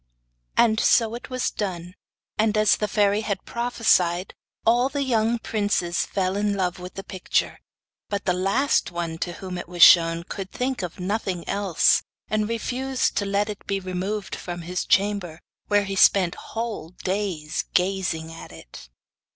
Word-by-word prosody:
And 220 -2 +4
so 225 -1 +3
it 240 +2 -7
was 255 -1 -1
done; 180 -4 -4 0.4
and 215 0 +1
as 215 0 +5
the 210 - -2
fairy 205 0 +2
had 200 -3 -3
prophesied, 200 -7 +1 0.3
all 240 +3 +4
the 280 0 -1
young 230 -2 +1
princes 205 -6 -1
fell 190 -1 -1
in 205 0 0
love 185 -2 -1
with 180 +1 -9
the 195 - -6
picture; 185 -2 -1 0.5
but 200 -1 -3
the 180 - +2
last 195 +10 +1
one 170 -2 -4
to 175 - -3
whom 180 0 -6
it - - -7
was 175 -1 +4
shown 165 -1 +7
could 190 +1 -6
think 255 -1 -2
of 180 -1 -6
nothing 185 -2 -2
else, 200 -4 +3 0.3
and 215 0 0
refused 255 +3 -1
to 200 - +1
let 200 +1 +1
it 210 -2 -7
be 195 0 0
removed 190 +2 -3
from 175 -1 -6
his 180 +2 -3
chamber, 195 -5 +1 0.3
where 205 0 +3
he 195 0 -4
spent 190 -2 +5
whole 225 -8 -5
days 185 -6 -2
gazing 180 -4 0
at 165 - -10
it. 65 -6 -12
195 Hz, 165 wpm, -24 LUFS, 180-215 Hz, 0.5 s, shown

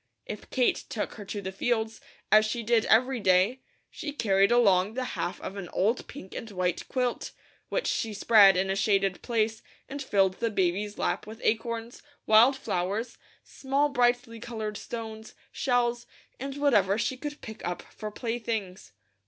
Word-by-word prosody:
If - - -8
Kate 255 -2 +1
took 210 - -3
her 210 - -9
to 200 0 -5
the 190 - -4
fields, 220 +2 -1 0.3
as 215 0 +7
she 235 +2 -3
did 225 0 +2
every 250 +3 +3
day, 195 +6 +3 0.3
she 295 - -5
carried 200 -6 +2
along 205 -3 +4
the 260 - -1
half 175 0 -3
of 200 - -6
an 185 -4 -6
old 220 +6 0
pink 190 -9 -10
and 230 - -6
white 180 -3 -2
quilt, 250 -2 -2 0.4
which - - -1
she 225 - -1
spread 205 -2 +6
in 190 +1 +1
a - - 0
shaded 195 -2 +1
place 220 -2 0 0.3
and 280 +1 -6
filled 195 -7 +1
the 230 - 0
baby's 200 +1 -1
lap - - -1
with 220 +1 -9
acorns, 230 +1 -1 0.2
wild 235 +5 +6
flowers, 205 +2 -3 0.2
small 275 +2 0
brightly 245 -3 +1
coloured 220 -2 -5
stones, 220 -1 -7 0.2
shells, 240 -2 0 0.3
and 275 +2 -5
whatever 210 -9 +3
she 230 +4 -1
could 295 +3 -6
pick 220 -1 -9
up 175 0 -3
for 215 - -8
playthings. 225 - -4
220 Hz, 165 wpm, -28 LUFS, 195-240 Hz, 0.4 s, as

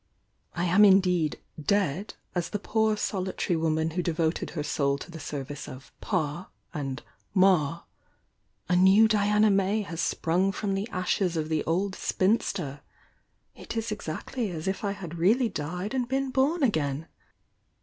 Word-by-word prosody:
I 175 0 0
am 185 +4 +5
indeed 180 -6 +4 0.2
'dead' 195 +1 0 0.2
as 175 -2 -1
the 210 - -2
poor 220 +1 +1
solitary 190 -3 -1
woman 160 0 0
who 180 +3 -1
devoted 165 -1 -1
her 150 - -1
soul 140 -1 0
to 155 - -10
the 165 - -8
service 145 -1 -6
of 130 +2 -10
'Pa' 170 -2 -2 0.2
and 140 -3 -4 0.3
'Ma'; 170 -4 +3 0.9
a 180 - +2
new 190 +5 +6
Diana 210 0 +3
May 195 +2 +2
has 165 -4 -4
sprung 180 +4 +1
from 195 +1 -2
the 195 +4 -2
adies 185 -1 0
of 155 0 -2
the 155 -1 0
old 190 +4 0
spinster! 185 -9 0 0.4
— - - -45
it - - -6
is 225 0 -2
exactly 210 +4 -4
as 160 -2 -5
if 190 +2 -2
I 200 -1 0
had 175 -4 -8
really 225 +8 +3
died 180 - -4
and 250 -2 0
been 270 +1 -1
bom 280 +5 +2
again! 155 - 0
185 Hz, 160 wpm, -27 LUFS, 160-205 Hz, 0.9 s, new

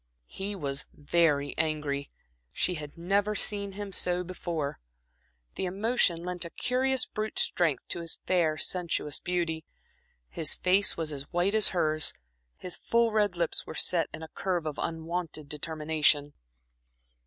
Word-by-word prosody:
He 200 - -5
was 140 -6 -1
very 145 -2 +2
angry; 150 -3 0 0.4
she 180 - 0
had 150 -3 -7
never 200 +5 +1
seen 200 -1 0
him 205 0 -6
so 180 -1 0
before. 170 -5 -4 0.7
The - - -3
emotion 190 -3 +2
lent 180 0 -4
a 170 - -6
curious 255 +5 +1
brute 215 0 -4
strength 160 -7 +2
to - - -4
his 165 -1 0
fair, 165 -4 +2
sensuous 170 -5 0
beauty. 170 -3 -2 0.7
His 155 -3 +3
face 190 +2 +3
was 160 -2 -1
as 140 -1 -6
white 180 +3 +1
as 215 -2 +4
hers, 155 -3 +1 0.4
his 180 -1 -2
full 235 -1 +2
red 210 -4 +2
lips 170 -1 -1
were - - -7
set 170 -2 +3
in 160 - -8
a 160 - -8
curve 180 -4 -2
of 155 -2 -4
unwonted 165 -2 -4
determination. 150 -1 +1
170 Hz, 145 wpm, -29 LUFS, 155-190 Hz, 0.7 s, as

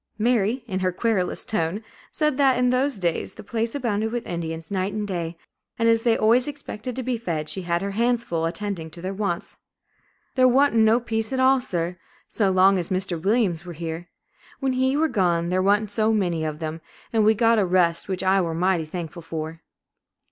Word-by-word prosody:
Mary, 230 +1 +1
in 190 -3 -2
her 185 -1 +1
querulous 190 -1 0
tone, 205 -2 -1 0.3
said 300 -2 +1
that 265 -3 +4
in 250 0 +3
those 260 0 +1
days 175 -3 -1
the 215 - -10
place 230 +3 -2
abounded 220 -5 -1
with 240 0 -3
Indians, 165 -1 -5
night 190 0 -1
and 210 -1 -3
day, 170 -3 -4 0.4
and 230 - +2
as 230 0 +4
they 230 -1 +2
always 235 +4 +4
expected 255 -5 -6
to 260 - -3
be 245 -1 -2
fed, 160 -8 -3
she 190 - -1
had 170 0 -1
her 200 - -2
hands 235 +3 +1
full 165 -7 -2
attending 170 -1 -4
to 170 - -10
their 185 +3 -4
wants. 195 -4 -3 0.8
"There 255 -1 +5
wa'n't 275 +3 +4
no 225 +1 +4
peace 225 -1 -3
at 260 - -1
all, 260 0 +4
sir, 175 -6 -3 0.3
so 205 -3 +1
long 190 +1 +4
as 170 - -4
Mr. 185 -3 -2
Williams 195 -4 +1
were 175 -1 -8
here; 165 +2 -6 0.5
when 270 -2 0
he 260 +2 +1
were 320 +1 +3
gone 175 - +1
there 185 +1 +1
wa'n't 205 +2 +2
so 215 +1 +2
many 175 -7 0
of 155 -1 -3
them, 160 0 -5 0.3
an' 220 -1 +3
we 220 +1 +5
got 230 +1 +4
a 200 - +3
rest, 175 -1 +2
which 185 -2 -2
I 190 +1 +3
were 165 -2 -2
mighty 180 -1 +1
thankful 170 +1 -6
for." 160 0 -6
200 Hz, 205 wpm, -24 LUFS, 170-230 Hz, 0.8 s, There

